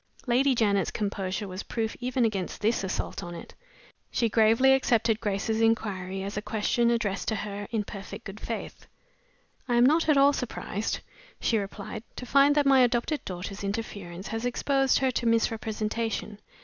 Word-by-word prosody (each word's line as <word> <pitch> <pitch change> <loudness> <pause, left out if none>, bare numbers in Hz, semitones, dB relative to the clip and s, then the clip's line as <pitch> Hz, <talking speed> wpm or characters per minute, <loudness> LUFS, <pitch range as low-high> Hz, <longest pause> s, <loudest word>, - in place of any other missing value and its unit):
Lady 260 +2 +3
Janet's 200 -4 +2
composure 200 -1 -3
was 185 +1 -5
proof 225 -1 -3
even 250 -1 +1
against 195 -5 -2
this 220 0 +1
assault 190 - -3
on 175 0 -7
it. 170 - -10 0.6
She 230 - +1
gravely 225 +5 +5
accepted 230 -4 +2
Grace's 220 +1 -1
inquiry 195 -4 0
as 200 +1 -5
a 210 - -2
question 225 +2 +1
addressed 220 -5 -1
to 220 - +1
her 205 -1 -5
in 220 -2 -1
perfect 200 -1 -8
good 195 +2 -8
faith. 230 - -6 0.8
"I 240 - +1
am 240 +1 +6
not 315 +4 +3
at 300 - +5
all 280 +1 +6
surprised," 225 -4 -3 0.4
she 225 - +1
replied, 200 +1 -6
"to 250 - -6
find 280 +3 +5
that 295 -1 +3
my 270 -1 +6
adopted 245 +4 +2
daughter's 190 +2 -6
interference 200 -3 -5
has 225 +1 -3
exposed 270 +2 +2
her 265 -1 +2
to 235 -1 -1
misrepresentation. 225 -1 -1
225 Hz, 165 wpm, -27 LUFS, 200-245 Hz, 0.8 s, am